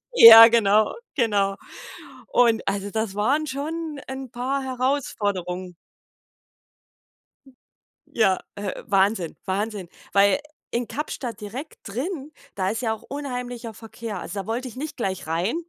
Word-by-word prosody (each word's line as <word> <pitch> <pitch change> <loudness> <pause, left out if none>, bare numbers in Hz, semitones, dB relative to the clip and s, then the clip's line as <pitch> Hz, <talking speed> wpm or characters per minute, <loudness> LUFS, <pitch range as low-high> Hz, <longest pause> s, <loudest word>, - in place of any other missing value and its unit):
Ja, 230 - +12
genau, 215 -2 +3 0.2
genau, 205 -6 +1 0.7
und 235 -2 +2
also 200 0 -2
das 220 -2 -2
waren 275 +9 +1
schon 300 +2 -4
'n 265 -2 -7
paar 265 +3 -2
Herausforderungen. 205 -9 -2 2.4
Ja, 195 -5 +2 0.2
äh, 200 -2 -5
Wahnsinn, 195 -3 +1
Wahnsinn. 200 -1 -3 0.2
Weil 200 +6 +4 0.3
in 240 0 -2
Kapstadt 245 -3 -5
direkt 240 +9 -7
drin, 280 - -4 0.2
da 190 -1 0
ist 225 +5 -3
ja 225 -2 0
auch 220 - -10
unheimlicher 250 -4 -6
Verkehr. 220 -2 -7
Also, 185 +3 -6
da - - -12
wollte 245 +3 -3
ich 240 - -10
nicht 295 +4 -6
gleich 190 -8 -3
rein. 170 - -1
225 Hz, 125 wpm, -24 LUFS, 200-260 Hz, 2.4 s, Ja